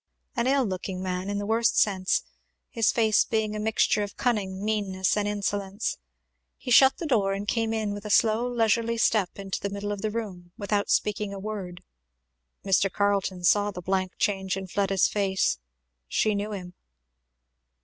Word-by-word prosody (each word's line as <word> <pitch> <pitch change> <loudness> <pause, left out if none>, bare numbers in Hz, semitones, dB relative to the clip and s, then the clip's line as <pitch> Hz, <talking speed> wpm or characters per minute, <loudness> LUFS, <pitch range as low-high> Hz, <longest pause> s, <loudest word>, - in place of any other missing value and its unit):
An 240 0 0
ill 270 -1 +3
looking 185 -1 -4
man, 185 +1 -3
in 205 - -2
the 205 - -3
worst 225 +2 +2
sense; 190 -3 +2 0.5
his 230 -3 +2
face 220 -2 +3
being 215 -1 -1
a - - -3
mixture 215 -1 +2
of 205 0 -5
cunning, 200 -5 -1
meanness, 195 -3 0
and 205 -1 0
insolence. 205 - -2 0.6
He 250 - -6
shut 265 +2 +7
the 340 - -5
door 210 -9 +2
and 200 +1 -4
came 225 +1 0 0.2
with 205 0 -7
a 210 - -6
slow 225 +3 +3
leisurely 230 0 +1
step 215 -4 +1
into 195 -2 -4
the 200 - -2
middle 200 +1 -4
of 205 -1 -4
the 215 - -1
room 190 -6 -6
without 205 0 -1
speaking 210 -1 0
a - - -6
word. 190 -4 -6 0.8
Mr. 195 0 +3
Carleton 200 -3 0
saw 205 +4 +4
the 185 - -7
blank 185 +1 -1
change 190 -2 0
in 190 - -5
Fleda's 195 0 +1
face. 190 - 0 0.5
She 215 - +1
knew 205 +1 -3
him. 180 -3 -7
205 Hz, 170 wpm, -26 LUFS, 190-215 Hz, 0.8 s, shut